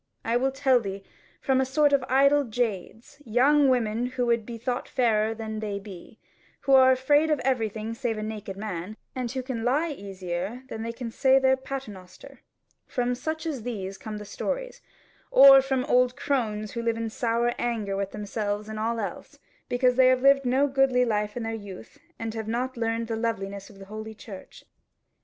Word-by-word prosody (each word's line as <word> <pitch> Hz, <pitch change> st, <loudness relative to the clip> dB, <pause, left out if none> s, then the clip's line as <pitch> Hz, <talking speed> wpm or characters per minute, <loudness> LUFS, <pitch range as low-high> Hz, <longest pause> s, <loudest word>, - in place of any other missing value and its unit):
I 230 Hz, -, +1 dB
will 260 Hz, +2 st, +2 dB
tell 265 Hz, -2 st, +3 dB
thee; 195 Hz, -3 st, -6 dB, 0.4 s
from 265 Hz, -1 st, +2 dB
a -, -, +3 dB
sort 290 Hz, +2 st, +2 dB
of 275 Hz, -2 st, +3 dB
idle 280 Hz, +2 st, +4 dB
jades, 225 Hz, +2 st, -4 dB
young 270 Hz, +5 st, +4 dB
women 240 Hz, -1 st, +1 dB
who 250 Hz, -1 st, -2 dB
would 235 Hz, -2 st, +1 dB
be 235 Hz, -1 st, -6 dB
thought 245 Hz, +2 st, -3 dB
fairer 225 Hz, -3 st, +1 dB
than 220 Hz, -1 st, -5 dB
they 210 Hz, -2 st, -3 dB
be, 195 Hz, +1 st, -11 dB, 0.4 s
who 275 Hz, -, -1 dB
are 260 Hz, -1 st, +7 dB
afraid 290 Hz, +4 st, +3 dB
of 300 Hz, -3 st, +2 dB
everything 225 Hz, -4 st, -1 dB
save 230 Hz, -2 st, -2 dB
a 215 Hz, -, -4 dB
naked 210 Hz, -3 st, -6 dB
man, 200 Hz, 0 st, -5 dB, 0.2 s
and 250 Hz, -2 st, -3 dB
who 260 Hz, -1 st, -3 dB
can 245 Hz, -3 st, -4 dB
lie 295 Hz, +7 st, +1 dB
easier 195 Hz, 0 st, -5 dB
than 220 Hz, -, -6 dB
they 230 Hz, +1 st, -3 dB
can 235 Hz, 0 st, -6 dB
say 265 Hz, +2 st, +4 dB
their 265 Hz, 0 st, +4 dB
paternoster: 225 Hz, -9 st, -9 dB, 0.5 s
from 245 Hz, 0 st, -1 dB
such 315 Hz, +6 st, -4 dB
as 295 Hz, -7 st, -3 dB
these 195 Hz, -5 st, -5 dB
come 215 Hz, -1 st, -6 dB
the 210 Hz, -, -8 dB
stories; -, -, -4 dB, 0.5 s
or 270 Hz, 0 st, +9 dB
from 265 Hz, -1 st, -1 dB
old 250 Hz, -2 st, +3 dB
crones 215 Hz, -6 st, -2 dB
who 235 Hz, -, -4 dB
live 230 Hz, -1 st, 0 dB
in 225 Hz, -1 st, -3 dB
sour 235 Hz, +1 st, 0 dB
anger 220 Hz, -5 st, -1 dB
with 195 Hz, 0 st, -2 dB
themselves 210 Hz, 0 st, -3 dB
and 220 Hz, 0 st, -6 dB
all 230 Hz, +1 st, -1 dB
else, 205 Hz, -, -6 dB, 0.3 s
because 250 Hz, 0 st, +2 dB
they 260 Hz, -1 st, +6 dB
have 255 Hz, 0 st, +3 dB
lived 275 Hz, 0 st, +5 dB
no 260 Hz, +3 st, +3 dB
goodly 270 Hz, -2 st, +3 dB
life 210 Hz, -1 st, -1 dB
in 240 Hz, -, -3 dB
their 225 Hz, 0 st, -3 dB
youth, 205 Hz, -2 st, -9 dB, 0.2 s
and 225 Hz, -1 st, -4 dB
have 220 Hz, -1 st, -5 dB
not 250 Hz, +3 st, -2 dB
learned 230 Hz, 0 st, -1 dB
the 225 Hz, 0 st, -3 dB
loveliness 200 Hz, -4 st, -3 dB
of 200 Hz, -2 st, -16 dB
holy 215 Hz, +2 st, -8 dB
church. 200 Hz, -3 st, -11 dB
235 Hz, 190 wpm, -26 LUFS, 215-260 Hz, 0.5 s, or